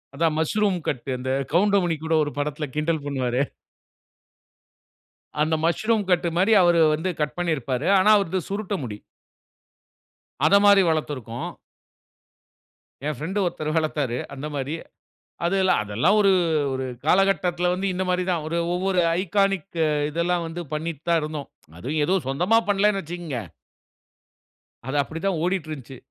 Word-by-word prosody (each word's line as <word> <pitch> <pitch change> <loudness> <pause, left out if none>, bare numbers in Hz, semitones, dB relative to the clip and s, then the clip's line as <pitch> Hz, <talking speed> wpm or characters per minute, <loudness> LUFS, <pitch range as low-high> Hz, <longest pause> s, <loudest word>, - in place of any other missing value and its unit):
அதான் 160 +1 +1
mushroom 195 +4 +1
cut 125 - -1 0.2
இந்த 130 +1 -5 0.2
கவுண்டமணி 185 -2 +3
கூட 160 0 -1
ஒரு 145 - -3
படத்தில 150 +1 -2
கிண்டல் 155 0 0
பண்ணுவாரே! 130 -3 -1 2.0
அந்த 160 +1 +2
மஸ்ரூம் 215 +5 +1
கட்மாரி 175 +3 +2
அவர் 175 -1 +4
வந்து 160 +5 -1
கட் 150 +3 -2
பண்ணியிருப்பாரு. 145 -5 -1
ஆனா 200 +3 +4
அவரது 190 -2 -1
சுருட்ட 200 0 -2
முடி. 105 -4 -5 1.5
அந்த 195 - +5
மாரி 200 -1 +7
வளர்த்திருக்கோம். 140 -7 -2 1.6
என் 150 -2 -2
பிரெண்ட் 185 +9 -3
ஒருத்தரு 155 -3 -2
வளர்த்தாரு. 150 -6 -1 0.2
அந்த 140 +2 -5
மாரி. 140 +2 -3 0.7
அதெல்லாம் 190 +1 +2
அதெல்லாம் 115 - +2
ஒரு 195 -1 +5 0.4
ஒரு 130 0 -3 0.2
காலகட்டத்தில 180 -1 +2
வந்து, 190 +2 -2
இந்த 185 - -1
மாதிரி 180 0 +1
தான். 165 -3 -1
ஒரு 165 +2 -2 0.2
ஒவ்வொரு 185 0 +1 0.2
ஐகானிக் 195 -2 0 0.3
இதெல்லாம் 170 +2 0
வந்து 165 +2 -6
பண்ணிட்டு 155 -1 -4
தான் 170 -1 +4
இருந்தோம். 150 -2 -5 0.3
அதுவும் 150 - -2
ஏதோ 185 - +2
சொந்தமா 180 +12 +2
பண்ணலன்னு 200 0 +2
வச்சுக்கோங்க. 165 -5 -6 1.5
அது 135 +3 -4
அப்டிதான் 165 +4 -2
ஓடிட்டு 180 -3 -1
இருந்துச்சு. 135 -3 -8
165 Hz, 130 wpm, -24 LUFS, 150-190 Hz, 2.0 s, மாரி